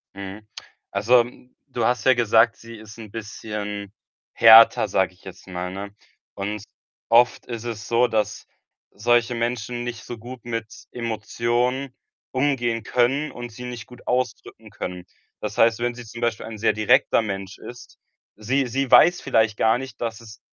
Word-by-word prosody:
Mhm. 100 +2 -8 0.5
Also, 120 +5 +4 0.5
du 120 -3 -1
hast 125 -2 0
ja 130 - +7
gesagt, 115 -1 +3
sie 115 0 -11
ist 110 0 -12
'n 110 -3 -10
bisschen 105 -2 -6 0.4
härter, 115 -1 +8
sage 95 -1 +1
ich 90 - -26
jetzt 95 0 -12
mal, 90 0 -5
ne? 100 +1 -7 0.4
Und 100 +1 -4 0.5
oft 120 +1 +4
ist 120 -2 -6
es 115 -3 -6
so, 120 +1 +3
dass 105 -2 -2 0.5
solche 120 +2 +1
Menschen 120 0 -3
nicht 120 -1 -6
so 120 - -7
gut 120 +2 -10
mit 115 -2 -3 0.3
Emotionen 120 +3 -2 0.4
umgehen 125 -4 0
können 130 +7 +1
und 120 0 -8
sie 125 +3 -9
nicht 120 -3 -7
gut 125 -1 -16
ausdrücken 125 -3 -3
können. 90 -2 -6 0.3
Das - - -5
heißt, 115 0 +4
wenn 120 0 -1
sie 120 - -9
zum 120 +2 -10
Beispiel 120 -2 -1
ein 110 -1 -8
sehr 110 - +2
direkter 115 +3 +3
Mensch 95 -3 -5
ist 120 0 -12 0.4
sie 130 +6 0
sie 135 +2 -2
weiß 170 +8 +6
vielleicht 110 -1 +1
gar 110 +2 +3
nicht, 130 -2 -9
dass 115 -1 -4
es 110 -2 -13
115 Hz, 165 wpm, -23 LUFS, 105-120 Hz, 0.5 s, härter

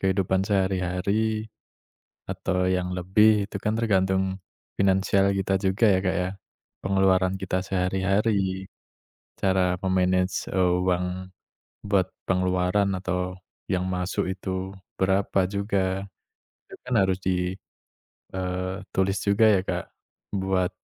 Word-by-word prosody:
kehidupan 95 0 +1
sehari-hari 100 +2 0 0.8
atau 90 -1 -1
yang 90 -1 0
lebih, 105 +3 +4
itu 100 - -5
kan 105 - +1
tergantung 95 -3 +1 0.4
finansial 95 0 +3
kita 95 0 +1
juga 95 +3 +1
ya, 95 -2 +4
Kak, 95 - +1
ya. 90 - -1 0.6
Pengeluaran 95 -1 +3
kita 95 -1 -1
sehari-hari, 95 +1 0 0.7
cara 95 -2 +2
me-manage 90 0 +1
uang 90 0 0 0.5
buat 100 -3 +2 0.2
pengeluaran 90 +2 +1
atau 90 0 -2 0.4
yang 90 -1 +1
masuk 90 0 -1
itu 95 0 -4 0.2
berapa 95 +1 +2
juga, 95 -1 -1 0.6
itu - - -11
kan 125 - -4
harus 95 -1 +2
di, 90 0 0 0.8
eee, 95 0 -2 0.2
tulis 95 +1 +1
juga 100 +2 +4
ya, 100 -3 +4
Kak, - - -2 0.5
buat, 95 -1 +1
95 Hz, 110 wpm, -25 LUFS, 90-100 Hz, 0.8 s, lebih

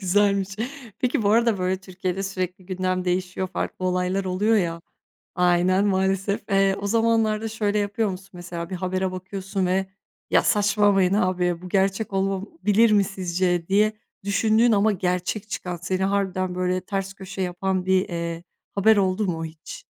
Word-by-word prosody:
Güzelmiş. 200 0 +2 0.5
Peki, 250 -2 0
bu 200 - +2
arada, 230 -1 +3
böyle 185 +1 0
Türkiye'de 185 0 -4
sürekli 185 -1 -4
gündem 185 -1 -1
değişiyor, 185 +1 -1
farklı 185 - -4
olaylar 180 +1 0
oluyor 205 +5 +2
ya. 170 -3 0 0.6
Aynen, 180 +2 +3
maalesef. 195 0 +1
Eee, 195 -1 +3
o 200 - -2
zamanlarda 225 0 +2
şöyle 210 -2 -1
yapıyor 205 +1 0
musun? 190 +1 -7
Mesela 175 -1 -6
bir 185 - -4
habere 185 +1 -1
bakıyorsun 190 +1 -3
ve; 190 +1 +1 0.4
"Ya, - - +5
saçmalamayın 205 -3 +3
abi. 180 -3 +1
Bu 180 - -8
gerçek 195 +2 0
olabilir 200 - +1
mi, 205 -1 +5
sizce?" 180 -2 -1
diye 210 +2 +3 0.3
düşündüğün 220 +3 +3
ama, 215 0 +4
gerçek 180 +2 -2
çıkan; 180 -3 -4
seni 185 +2 -2
harbiden 190 -2 0
böyle 185 0 0
ters 195 0 -3
köşe 195 0 -7
yapan, 185 +1 -1
bir, 190 0 +2
eee, 170 0 -4 0.3
haber 215 +2 +5
oldu 195 +1 +1
mu 165 -2 -2
hiç? 160 0 -10
190 Hz, 155 wpm, -24 LUFS, 180-205 Hz, 0.6 s, Ya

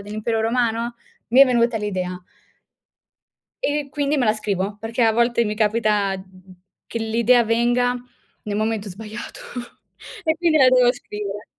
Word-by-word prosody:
dell'impero 215 +2 -2
romano? 230 0 0 0.3
Mi 255 +4 +5
è 275 - +9
venuta 235 -2 +2
l'idea. 185 -3 -3 1.4
E - - +2
e 285 -1 -5
quindi 290 0 0
me 255 - +2
la 215 - +4
scrivo, 205 -1 -2
perché 230 +2 -2
a 225 - +4
volte 235 0 +2
mi 210 0 -2
capita, 210 -2 +1
mh - - -8
mh 185 -1 -17
mhmm, - - -13 0.4
che 230 - -3
l'idea 230 +2 +3
venga 240 +2 +2 0.5
nel 205 -3 -3
momento 215 -1 -1
sbagliato 215 +4 -8 0.9
e 320 0 +1
quindi 330 -2 +2
la 260 -2 +7
devo 250 -1 +5
scrivere. 210 -3 -7
225 Hz, 160 wpm, -22 LUFS, 210-245 Hz, 1.4 s, è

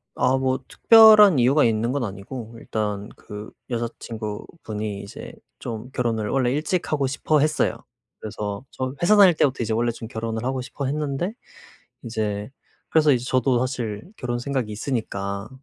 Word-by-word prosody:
아 130 +1 +2
뭐 130 0 0
특별한 215 - +7
이유가 135 +5 +4
있는 115 +1 +1
건 140 -1 -1
아니고 110 +3 -7
일단 105 -2 -3
그 105 +1 -9 0.2
여자 120 -1 -1
친구분이 110 -1 -6
이제 100 - -9 0.3
좀 115 +1 -6
결혼을 115 -4 -1
원래 130 -3 +1
일찍 155 +6 -1
하고 140 -3 +1
싶어 150 +3 +1
했어요. 155 +1 +1 0.4
그래서 105 +1 -5
저 130 0 -4
회사 180 +5 +5
다닐 195 -4 +7
때부터 135 -5 +1
이제 110 0 -1
원래 120 +1 +1
좀 115 0 -8
결혼을 115 -1 -4
하고 130 +1 -1
싶어 140 +2 -5
했는데 150 +6 -2 0.7
이제 105 -3 -3 0.4
그래서 155 -2 +4
이제 125 -3 +1
저도 130 -1 +2
사실 120 -5 -3
결혼 120 -1 -3
생각이 130 -4 -2
있으니까 100 -3 -3
120 Hz, 330 characters per minute, -23 LUFS, 110-140 Hz, 0.7 s, 특별한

